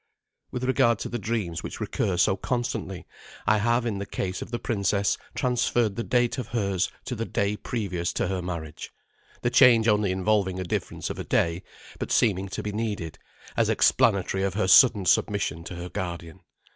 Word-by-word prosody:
With 125 Hz, -, -5 dB
regard 130 Hz, -3 st, +3 dB
to -, -, -4 dB
the 120 Hz, -, -3 dB
dreams 105 Hz, -7 st, -2 dB
which -, -, -7 dB
recur 95 Hz, -3 st, -1 dB
so 95 Hz, +2 st, +3 dB
constantly, 110 Hz, -4 st, -3 dB, 0.4 s
I 110 Hz, 0 st, +3 dB
have 120 Hz, +3 st, +1 dB
in 105 Hz, -4 st, -2 dB
the 100 Hz, -, -5 dB
case 95 Hz, -2 st, -3 dB
of -, -, -6 dB
the 120 Hz, -, -2 dB
princess 100 Hz, -4 st, 0 dB, 0.2 s
transferred 120 Hz, -4 st, +1 dB
the 115 Hz, -, -2 dB
date 125 Hz, +2 st, +1 dB
of 120 Hz, -, -4 dB
hers 100 Hz, -6 st, 0 dB, 0.2 s
to -, -, -4 dB
the 115 Hz, -1 st, -3 dB
day 100 Hz, +1 st, 0 dB
previous 95 Hz, -7 st, -3 dB
to -, -, -1 dB
her 95 Hz, 0 st, -2 dB
marriage, 85 Hz, -4 st, -6 dB, 0.5 s
the 120 Hz, -, +1 dB
change 120 Hz, -4 st, +6 dB
only 105 Hz, -3 st, +3 dB
involving 95 Hz, -1 st, +1 dB
a -, -, -2 dB
difference 85 Hz, -, -3 dB
of -, -, -7 dB
a -, -, -3 dB
day, 85 Hz, +1 st, +1 dB, 0.4 s
but -, -, -4 dB
seeming 100 Hz, -1 st, +2 dB
to -, -, -5 dB
he 105 Hz, -, -2 dB
needed, 105 Hz, -7 st, -4 dB, 0.4 s
as -, -, +2 dB
explanatory 95 Hz, 0 st, +3 dB
of 95 Hz, 0 st, -1 dB
her 100 Hz, -3 st, +1 dB
sudden 105 Hz, 0 st, +6 dB
submission 95 Hz, -4 st, +1 dB
to 90 Hz, -, -7 dB
her 90 Hz, +1 st, -6 dB
guardian. 85 Hz, -2 st, -5 dB
100 Hz, 185 wpm, -26 LUFS, 95-115 Hz, 0.5 s, change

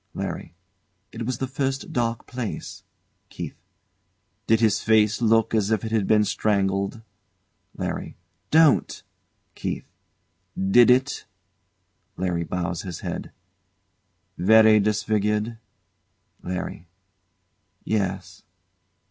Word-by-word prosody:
LARRY. 85 Hz, -, -5 dB, 0.6 s
It 115 Hz, 0 st, -5 dB
was 130 Hz, -2 st, -2 dB
the 130 Hz, -, -2 dB
first 135 Hz, +1 st, -3 dB
dark 115 Hz, -1 st, -1 dB
place. 125 Hz, -4 st, -6 dB, 0.5 s
KEITH. -, -, -6 dB, 0.9 s
Did 115 Hz, 0 st, +4 dB
his 110 Hz, -3 st, +2 dB
face 110 Hz, 0 st, +3 dB
look 115 Hz, -1 st, +3 dB
as 105 Hz, -2 st, +2 dB
if 110 Hz, -3 st, 0 dB
he'd 110 Hz, -3 st, 0 dB
been 105 Hz, -1 st, +4 dB
strangled? 100 Hz, +1 st, 0 dB, 0.7 s
LARRY. -, -, -4 dB, 0.3 s
Don't! 160 Hz, -2 st, +4 dB, 0.5 s
KEITH. -, -, -4 dB, 0.7 s
Did 95 Hz, +6 st, +5 dB
it? 130 Hz, +3 st, +2 dB, 0.9 s
[LARRY 90 Hz, -2 st, -1 dB
bows 90 Hz, -1 st, -3 dB
his 90 Hz, -4 st, -7 dB
head.] -, -, -5 dB, 1.1 s
Very 110 Hz, +3 st, +6 dB
disfigured? 105 Hz, +1 st, 0 dB, 0.8 s
LARRY. 90 Hz, -1 st, -5 dB, 1.0 s
Yes. 95 Hz, -3 st, -2 dB
110 Hz, 95 wpm, -24 LUFS, 95-115 Hz, 1.1 s, Very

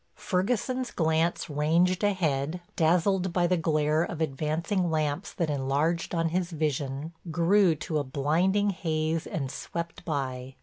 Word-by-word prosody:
Ferguson's 245 Hz, +6 st, -1 dB
glance 160 Hz, +1 st, +1 dB
ranged 165 Hz, +5 st, +2 dB
ahead, 165 Hz, -5 st, 0 dB, 0.2 s
dazzled 180 Hz, +3 st, +2 dB
by 175 Hz, 0 st, +2 dB
the 180 Hz, +1 st, +3 dB
glare 155 Hz, -2 st, +1 dB
of 170 Hz, -1 st, -3 dB
advancing 160 Hz, +5 st, -1 dB
lamps 155 Hz, +3 st, -1 dB
that 165 Hz, -4 st, -1 dB
enlarged 145 Hz, +6 st, 0 dB
on 165 Hz, 0 st, +1 dB
his 175 Hz, +1 st, -1 dB
vision, 150 Hz, -1 st, -2 dB, 0.2 s
grew 175 Hz, +2 st, +4 dB
to 155 Hz, 0 st, -2 dB
a -, -, -1 dB
blinding 170 Hz, +10 st, +1 dB
haze 160 Hz, -3 st, -1 dB
and 135 Hz, -4 st, -3 dB
swept 170 Hz, 0 st, -6 dB
by. 130 Hz, -5 st, -3 dB
165 Hz, 135 wpm, -28 LUFS, 150-180 Hz, 0.2 s, grew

